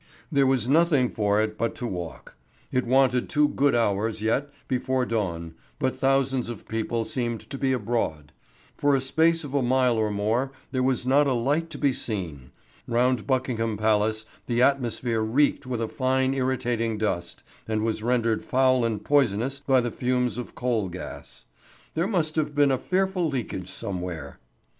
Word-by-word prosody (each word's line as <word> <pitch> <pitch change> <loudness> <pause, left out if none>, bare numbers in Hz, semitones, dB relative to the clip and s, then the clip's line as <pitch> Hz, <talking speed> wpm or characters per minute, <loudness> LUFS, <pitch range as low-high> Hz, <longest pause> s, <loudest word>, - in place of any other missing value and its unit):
There 140 -3 +3
was 130 -3 +1
nothing 150 -3 +3
for 105 -1 +1
it 110 0 -4
but 115 -1 -1
to 125 - -5
walk. 90 -7 -6 0.4
It 125 -1 0
wanted 130 -1 +3
two 150 -3 +3
good 140 -2 +2
hours 110 -1 +1
yet 115 +7 0 0.2
before 130 0 0
dawn, 85 -8 -2 0.2
but 130 - -1
thousands 135 -2 +1
of 120 - -8
people 115 +1 -2
seemed 120 -3 -3
to - - -4
be 135 -1 0
abroad. 105 - -2 0.4
For 145 -1 +2
a - - +2
space 160 +5 +2
of 145 -2 -7
a 140 - +2
mile 125 -1 +2
or 110 -1 +1
more 110 +6 0 0.2
there 130 - 0
was 130 -1 +1
not 140 +3 +4
a 135 - +2
light 145 +8 0
to - - -7
be 140 -2 +2
seen. 85 - -5 0.4
Round 120 -2 +1
Buckingham 115 -4 0
Palace 110 +1 +1 0.2
the 120 -1 0
atmosphere 125 -3 +1
reeked 130 +4 +1
with 120 -3 -2
a - - -1
fine 130 +2 +1
irritating 120 -4 -1
dust, 85 -5 -3 0.2
and 110 -1 -1
was 110 -1 -1
rendered 115 -1 +1
foul 130 -1 +3
and 110 -3 -2
poisonous 135 -1 +2
by 135 -2 +3
the 120 -1 -2
fumes 125 -2 0
of 125 - -7
coal 115 -6 0
gas. 90 +1 -9 0.5
There 165 +3 0
must 165 -7 0
have 150 -2 0
been 145 -1 +4
a 130 - +2
fearful 185 -2 0
leakage 115 -9 -4
somewhere. 90 -6 -5
125 Hz, 170 wpm, -26 LUFS, 110-135 Hz, 0.5 s, not